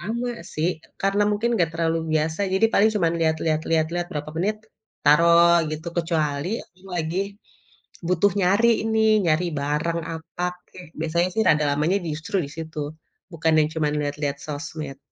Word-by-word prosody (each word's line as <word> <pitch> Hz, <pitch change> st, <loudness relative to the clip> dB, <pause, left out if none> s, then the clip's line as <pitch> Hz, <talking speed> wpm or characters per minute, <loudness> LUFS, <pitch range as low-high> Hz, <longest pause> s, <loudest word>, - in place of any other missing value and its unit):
lama 235 Hz, +7 st, -3 dB, 0.2 s
sih. 160 Hz, +3 st, +1 dB, 0.3 s
Karena 195 Hz, +1 st, +2 dB
mungkin 225 Hz, +3 st, 0 dB
enggak 170 Hz, -5 st, +1 dB
terlalu 165 Hz, 0 st, 0 dB
biasa 155 Hz, +3 st, 0 dB
jadi 195 Hz, +4 st, +4 dB
paling 215 Hz, +2 st, +5 dB
cuman 170 Hz, -5 st, +2 dB
lihat 160 Hz, -1 st, +2 dB
lihat 155 Hz, -1 st, +1 dB
lihat 160 Hz, -1 st, +3 dB
lihat 175 Hz, 0 st, -1 dB
berapa 150 Hz, 0 st, -4 dB
menit 200 Hz, +6 st, 0 dB, 0.5 s
taruh 170 Hz, +2 st, +6 dB
gitu, 155 Hz, +2 st, -5 dB
kecuali 155 Hz, -3 st, -1 dB, 0.2 s
aku 180 Hz, -, -29 dB
lagi 165 Hz, +1 st, -2 dB, 0.9 s
butuh 180 Hz, +3 st, +3 dB
nyari 200 Hz, +6 st, +4 dB, 0.2 s
ini, 220 Hz, 0 st, 0 dB, 0.3 s
nyari 165 Hz, +2 st, +2 dB
barang 150 Hz, +4 st, -1 dB
apa 165 Hz, +2 st, -6 dB, 0.2 s
kek, 180 Hz, -1 st, -12 dB
biasanya 170 Hz, +2 st, +1 dB
sih 220 Hz, -, +1 dB
rada 150 Hz, -1 st, +4 dB
lamanya 150 Hz, +6 st, +1 dB
di -, -, -4 dB
justru 155 Hz, +6 st, -4 dB
di 140 Hz, -, -8 dB
situ, 160 Hz, -1 st, -7 dB, 0.5 s
bukan 165 Hz, -1 st, +1 dB
yang 150 Hz, -1 st, +4 dB
cuman 150 Hz, -2 st, 0 dB
lihat-lihat 145 Hz, 0 st, -2 dB
sosmed. 150 Hz, -2 st, -6 dB
165 Hz, 165 wpm, -24 LUFS, 155-180 Hz, 0.9 s, taruh